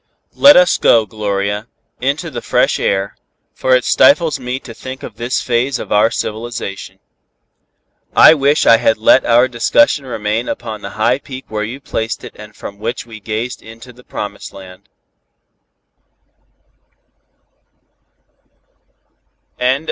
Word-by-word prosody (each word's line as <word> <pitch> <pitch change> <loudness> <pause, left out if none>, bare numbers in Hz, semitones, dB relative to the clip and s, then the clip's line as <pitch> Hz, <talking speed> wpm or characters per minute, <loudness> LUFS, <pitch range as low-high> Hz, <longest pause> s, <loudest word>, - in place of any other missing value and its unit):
Let 285 0 +7
us 270 0 +4
go, 115 -2 +4
Gloria, 105 0 -3 0.3
into 145 +6 -2
the 120 -2 -6
fresh - - +1
air, 95 0 -1 0.4
for 130 - +2
it 125 - +1
stifles 155 -1 +3
me 125 +1 -4
to 115 - -10
think 130 +3 -9
of 105 - -9
this 120 +3 -2
phase 125 +2 0
of - - -8
our 105 +2 +4
civilization. 110 -3 -5 1.2
I - - +8
wish 145 0 +2
I 115 - +7
had 110 - +1
let 110 +4 +4
our 120 +2 +4
discussion 135 - +2
remain 110 0 -2
upon 110 -3 -5
the - - -7
high 120 +4 +2
peak 130 -2 -10
where 105 -1 -3
you 120 +5 -6
placed 115 -4 -4
it - - -10
and 105 0 -13
from 100 0 -9
which 115 +3 -4
we 115 -2 -11
gazed 110 +4 -4
into 115 +2 -13
the 125 +1 -18
promised 105 -3 -7
land." 90 -1 -13
115 Hz, 135 wpm, -16 LUFS, 105-130 Hz, 1.2 s, I